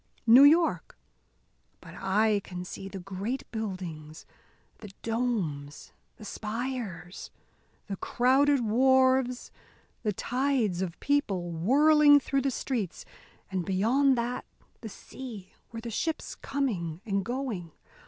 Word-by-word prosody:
New 235 +3 +8
York! 325 +4 +3 0.8
But - - -13
I 205 +2 +1
can 180 -1 -7
see 195 - -7
the 195 - -7
great 195 +8 -4
buildings, 180 -8 -6 0.5
the 210 - -10
domes, 205 -12 -3 0.2
the 215 - -12
spires, 215 -5 -5 0.6
the 195 -2 -5
crowded 265 +5 +3
wharves, 260 +2 +3 0.5
the 215 - 0
tides 245 -4 0
of 175 -3 -4
people 195 -12 0
whirling 290 - +5
through 275 0 -1
the 275 - 0
streets 235 -8 -3 0.5
and 185 -2 -1
beyond 240 +9 +2
that, 240 +1 -2 0.3
the 220 - -8
sea, 215 -4 -10 0.2
with 230 0 -7
the 235 - -5
ships 320 +8 -3
coming 190 - -3
and 200 -2 -1
going! 235 -8 -4
225 Hz, 115 wpm, -28 LUFS, 190-265 Hz, 0.8 s, New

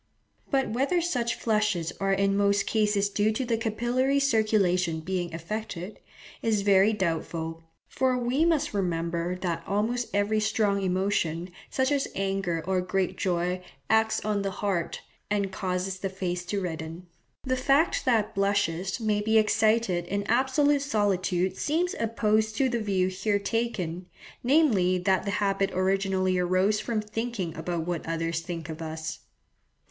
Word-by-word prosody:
But 270 -2 +1
whether 270 +10 +1
such 250 -9 0
flushes 210 -7 0
are 195 0 +1
in 195 0 +2
most 200 0 +2
cases 210 -2 +2
due 205 +1 +1
to 255 +4 -2
the 235 -1 +1
capillary 240 +5 +1
circulation 205 -10 +2
being 175 0 -2
affected, 185 +2 -5 0.4
is 215 -3 +1
very 200 +1 +5
doubtful; 165 -4 -2 0.3
for 260 -1 +1
we 250 +5 +1
must 330 -8 +1
remember 170 -2 -1
that 170 -2 -3
almost 225 +5 0
every 205 +2 +1
strong 215 -2 +1
emotion, 180 -2 0 0.2
such 260 +1 0
as 280 -1 +1
anger 195 -4 -1
or 185 0 +1
great 185 0 -1
joy, 180 0 -1 0.3
acts 220 -1 +2
on 210 -1 0
the 195 - -1
heart, 190 -3 -2 0.3
and 200 -2 0
causes 185 0 -2
the 195 - -2
face 180 -2 -3
to 200 +3 -2
redden. 165 -1 -5 0.4
The 260 -1 0
fact 275 +5 +2
that 225 -4 +2
blushes 195 -2 0
may 215 -2 +1
be 220 +1 +3
excited 215 -4 +2
in 200 +2 -1
absolute 265 +6 +2
solitude 190 -6 0
seems 340 +4 0
opposed 220 -1 +1
to 265 0 +3
the 240 -2 -1
view 190 -3 +1
here 200 +3 0
taken, 200 -5 -2 0.4
namely 240 - +3
that 190 +1 +1
the - - -1
habit 195 -1 +1
originally 185 0 +1
arose 185 +4 +2
from 225 -1 -1
thinking 210 -5 -4
about 165 0 -3
what 175 -2 -3
others 165 0 -1
think 165 -2 -6
of 160 0 -7
us. 160 0 -5
200 Hz, 150 wpm, -27 LUFS, 180-220 Hz, 0.4 s, very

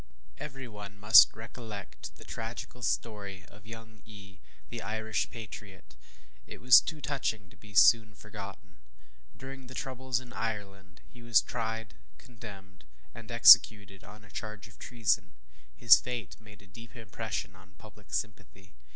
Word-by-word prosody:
Every 135 -2 -8
one 105 -2 -11
must 105 +5 +8
recollect 110 -3 -10
the - - -14
tragical 115 +2 -8
story 100 -5 -4
of 105 +1 -18
young 115 -1 -12
E, 100 -3 -14 0.3
the - - -6
Irish 110 +1 -3
patriot; 105 -4 -11 0.5
it - - -11
was 125 0 +7
too 155 -2 -7
touching 110 -9 -3
to - - -19
be 105 -1 -17
soon 110 +1 +5
forgotten. 100 -2 -11 0.6
During 135 0 -10
the 130 - -11
troubles 130 -2 -3
in 125 -2 -13
Ireland, 100 -4 -6
he 120 - -17
was 120 -3 +4
tried, 115 -1 -5 0.2
condemned, 100 -6 -13 0.3
and 115 -1 -12
executed, 105 -4 +6
on 105 +2 -14
a 100 - -19
charge 110 0 -8
of 110 - -20
treason. 95 -5 -1 0.4
His 115 +3 +7
fate 120 -6 -6
made 105 -1 -16
a - - -18
deep 115 +5 -15
impression 110 -3 -6
on 95 +1 -19
public 105 -2 -17
sympathy. 95 -2 -6
110 Hz, 145 wpm, -29 LUFS, 100-115 Hz, 0.6 s, must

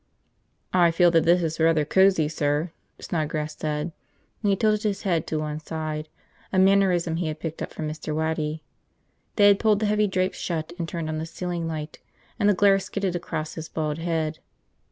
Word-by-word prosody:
"I 175 -2 +5
feel 170 +1 +4
that 165 -2 +3
this 175 +1 +4
is 160 0 -2
rather 160 -2 +3
cozy, 190 -2 +4
sir," 150 +2 -1 0.3
Snodgrass 155 -2 -3
said, 150 +2 -3 0.5
and 205 - +1
he 195 - +4
tilted 215 +1 +2
his 210 -2 -2
head 170 -6 0
to 155 - -1
one 155 0 -3
side, 155 -1 -5 0.4
a 190 - 0
mannerism 185 -3 +3
he 170 -1 -1
had 155 0 -4
picked 160 0 -5
up - - -4
from 155 - -4
Mr. 155 0 -4
Waddy. 160 -1 -2 0.7
They 205 -2 +6
had 200 0 +4
pulled 215 -2 +3
the 215 - 0
heavy 210 0 +2
drapes 185 -1 -1
shut 165 -1 -3
and 165 -1 -3
turned 165 -2 -4
on 155 0 -2
the 160 - -4
ceiling 175 0 -4
light, 155 -1 -5 0.4
and 205 -1 +4
the 205 - +4
glare 195 +1 +5
skidded 195 -2 -3
across 155 -3 -4
his 160 0 -7
bald 155 -1 -2
head. 160 -2 -2
165 Hz, 195 wpm, -25 LUFS, 155-185 Hz, 0.7 s, They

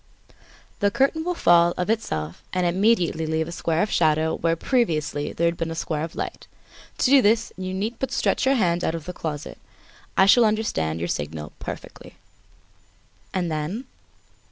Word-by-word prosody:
The 205 - +3
curtain 275 +8 +1
will 355 +1 -1
fall 175 - +4
of 180 - -1
itself 85 - -2
and 180 -1 +1
immediately 175 -3 +2
leave 160 0 0
a - - -6
square 165 -1 0
of 210 - -3
shadow 160 -1 +2
where 165 0 +1
previously 160 - 0
there 170 - -1
had 170 0 +1
been 165 -1 -2
a 165 - -4
square 155 -2 -2
of 165 - -6
light. - - -5 0.5
To - - +1
do 275 -1 +8
this, 225 +1 +2
you 185 0 -5
need 215 +5 -3
but 265 - -2
stretch 270 - +1
your 270 +1 +3
hand 175 -7 +1
out 160 - 0
of 165 -2 -7
the 180 - -5
closet, 155 -4 -6 0.6
I 190 - +7
shall 235 +5 +6
understand 210 - 0
your 85 +1 -2
signal 75 -1 -4
perfectly." - - -9 1.2
"And 180 -3 -1
then?" 155 - -3
170 Hz, 180 wpm, -24 LUFS, 160-215 Hz, 1.2 s, do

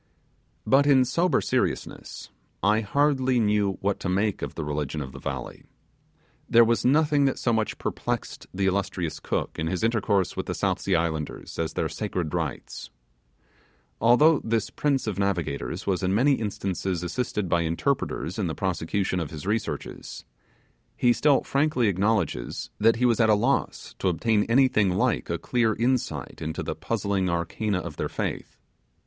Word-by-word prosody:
But 135 +5 +4
in 130 -3 +5
sober 170 +8 +1
seriousness, - - -3 0.3
I 105 +2 +4
hardly 130 +2 +2
knew 105 -2 +2
what 100 0 0
to - - -3
make 100 +2 0
of - - -5
the 80 - -3
religion 75 0 -3
of 65 -3 -5
the 65 - -10
valley. 65 -2 -6 0.9
There 120 0 +7
was 115 0 +1
nothing 145 +1 +3
that 135 - +1
so 120 - 0
much 110 -1 -1
perplexed - - -4
the 95 +1 -1
illustrious 95 -3 -1
Cook, - - -3
in 80 - -1
his 90 +4 -2
intercourse 105 -5 +1
with - - -4
the - - -2
South - - 0
Sea - - +1
islanders, 80 -2 -3
as 80 -1 -1
their - - -1
sacred 85 -4 -3
rites. 80 -6 -4 1.1
Although 140 +7 +5
this 115 -1 -1
prince 140 -3 0
of 105 -3 -3
navigators 90 -8 -2
was 95 -2 0
in 95 +1 +1
many 135 +6 +4
instances 95 -5 -2
assisted 105 +1 -2
by 85 0 +2
interpreters 85 - -1
in - - 0
the - - -3
prosecution 90 +2 -1
of 80 -4 -3
his 80 +1 -8
researches, 110 +2 -4 0.7
he 120 -1 +4
still 145 +2 +3
frankly 140 -4 +1
acknowledges 95 - -1
that 115 +2 +5
he 125 +2 +1
was 120 -2 +3
at 110 -1 +4
a 105 - +6
loss 120 +7 -1
to - - 0
obtain 105 +4 +1
anything 115 -5 +3
like 90 - 0
a - - 0
clear 115 -3 +1
insight 125 -5 -1
into 80 0 -3
the - - -3
puzzling 95 -2 -1
arcana 85 +4 -1
of 85 -4 -6
their - - -2
faith. - - -4
105 Hz, 165 wpm, -26 LUFS, 90-120 Hz, 1.1 s, There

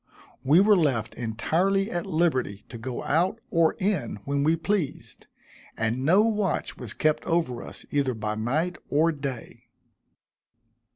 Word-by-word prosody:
We 145 +6 +5
were 205 +2 +6
left 135 - +1
entirely 175 - 0
at 175 +3 -3
liberty 155 - 0
to 120 - -8
go 125 +1 -5
out 180 +9 +1
or 165 -2 +3
in 190 - -1
when 140 0 0
we 160 +3 +3
pleased, 170 -2 -3 0.5
and 115 +3 -1
no 185 +8 +5
watch 210 -5 0
was - - -7
kept 155 -1 +1
over 165 -8 0
us - - -11
either 140 -4 +1
by 110 -1 -3
night 155 +11 -1
or 160 +3 +3
day. 135 -6 -7
155 Hz, 140 wpm, -26 LUFS, 125-180 Hz, 0.5 s, were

